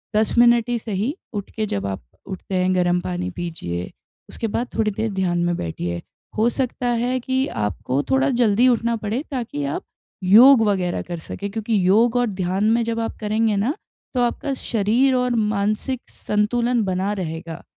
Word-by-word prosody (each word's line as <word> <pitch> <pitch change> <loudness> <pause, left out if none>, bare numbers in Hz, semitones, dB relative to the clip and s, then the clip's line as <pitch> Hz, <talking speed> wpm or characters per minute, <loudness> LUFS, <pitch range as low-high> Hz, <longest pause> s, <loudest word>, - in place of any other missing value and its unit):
10 220 +2 +1
minute 240 0 +5
ही 240 - +1
सही। 220 - -2 0.2
उठ 205 -1 -4
के 220 - 0
जब 100 - -3
आप 95 -8 -5 0.2
उठते 190 0 -5
हैं, 185 0 +2
गर्म 180 -1 +2
पानी 180 0 -3
पीजिए, 160 - -5 0.4
उसके 225 - -3
बाद 235 +4 -2
थोड़ी 220 -1 +1
देर 220 +2 -2
ध्यान 180 -2 0
में 175 - +1
बैठिए, 85 +1 -4 0.4
हो 220 +2 +3
सकता 250 0 -3
है 245 +2 0
कि 260 +2 0
आपको 105 +6 -1
थोड़ा 270 +2 +3
जल्दी 240 -2 +3
उठना 235 -1 +2
पड़े 220 +4 -2
ताकि 235 - -3
आप 140 - -3 0.4
योग 230 +6 +8
वगैरह 185 -3 0
कर 175 -1 -6
सके, 200 +5 -6
क्योंकि 220 +1 -1
योग 225 +5 +4
और 245 - +3
ध्यान 190 0 -1
में 235 +1 +3
जब 230 0 -2
आप 225 - -3
करेंगे 215 0 +1
ना, 220 +9 +1 0.4
तो 250 - +1
आपका 245 +3 -1
शरीर 240 +2 +1
और 250 -1 +1
मानसिक 215 +4 0
संतुलन 235 +3 0
बना 190 +2 -1
रहेगा। 165 -3 -5
215 Hz, 175 wpm, -22 LUFS, 185-240 Hz, 0.4 s, योग